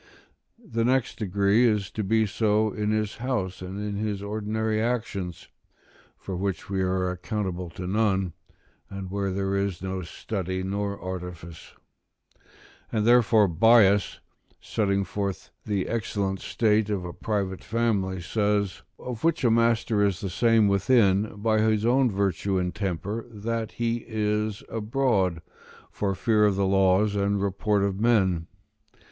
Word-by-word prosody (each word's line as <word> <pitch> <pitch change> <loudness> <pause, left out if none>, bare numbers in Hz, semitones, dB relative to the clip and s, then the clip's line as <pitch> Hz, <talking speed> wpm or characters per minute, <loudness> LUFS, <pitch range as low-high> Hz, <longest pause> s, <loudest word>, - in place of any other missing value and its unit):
The 195 - -3
next 125 0 +1
degree 100 +2 +2
is 105 -4 0
to 110 - -3
be 110 +3 +2
so 110 +1 +1
in 105 -1 -2
his 110 -1 -1
house, 115 -8 -2
and 95 +2 -6
in 105 -1 -3
his 105 -2 -2
ordinary 110 +1 -1
actions, 110 -7 -3 0.7
for 95 - -6
which 95 0 -3
we 95 -1 0
are 90 0 0
accountable 90 -1 -4
to 90 +2 -7
none, 95 -2 +1 0.6
and 95 -2 -7
where 100 0 -1
there 95 +1 -1
is 100 -2 -2
no 95 0 -3
study 95 +1 -4
nor 100 +1 -3
artifice. 90 -2 -7 1.2
And 110 -2 0
therefore 115 -3 +5
Bias, 105 +2 +4 0.4
setting 100 -2 0
forth 100 +1 -4 0.2
the 100 -3 -1
excellent 100 -4 -2
state 105 -2 +1
of 100 -4 -2
a 85 - -6
private 95 0 -3
family, 100 -5 0
says: 100 +1 0 0.2
"of 120 -3 -7
which 165 -2 +1
a - - +5
the - - +3
master 115 -2 +2
is 100 -3 +1
the 95 - -4
same 115 +2 +4
within, 100 0 +3
by 110 -1 +3
his 110 0 +2
own 125 +2 +4
virtue 100 -1 0
and 90 -1 -1
temper, 100 +3 -3
that 115 0 -4
he 115 0 -1
is 105 -1 -1
abroad, 105 -7 0 0.5
for 100 -2 -1
fear 105 +2 +3
of 100 - +1
the 100 0 +1
laws 95 +2 +3
and 100 0 +1
report 100 +1 0
of 100 -1 -1
men." 95 -8 +2
100 Hz, 145 wpm, -26 LUFS, 95-110 Hz, 1.2 s, therefore